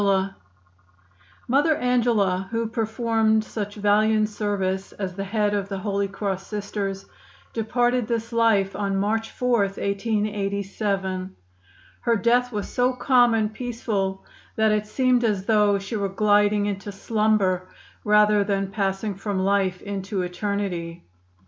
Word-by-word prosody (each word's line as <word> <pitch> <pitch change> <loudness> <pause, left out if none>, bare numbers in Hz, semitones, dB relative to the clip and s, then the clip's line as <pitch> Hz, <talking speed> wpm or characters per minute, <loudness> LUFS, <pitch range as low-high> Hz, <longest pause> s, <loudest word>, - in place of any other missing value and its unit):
Mother 290 +5 +3
Angela, 225 -8 +1
who 230 0 -1
performed 220 -1 +1
such 205 -2 -5
valiant 215 +1 +3
service 195 -2 -2
as 190 -2 -4
the 195 +2 -4
head 205 0 0
of 200 -1 -2
the 195 - -3
Holy 200 0 -1
Cross 195 -1 -4
Sisters, 200 -2 -4 0.5
departed 240 +1 +1
this 230 0 -2
life 220 -4 +2
on 200 -1 -1
March 220 +3 0
4, 250 -2 +1
1887. 200 -1 -2 0.6
Her 235 -1 +1
death 245 +3 +2
was 210 -3 -3
so 250 +1 +1
calm 245 -2 +4
and 215 -1 0
peaceful 215 -5 -3 0.3
that 220 -1 +3
it 210 0 0
seemed 250 +2 +2
as 205 -4 0
though 210 -2 +3
she 195 +3 -5
were 200 -2 -1
gliding 205 0 +3
into 205 0 -4
slumber 200 -3 +1 0.3
rather 210 0 +4
than 195 -1 -1
passing 195 +1 -1
from 195 +1 -4
life 195 -2 +1
into 195 -1 -3
eternity. 180 - -3
205 Hz, 130 wpm, -24 LUFS, 195-225 Hz, 0.6 s, calm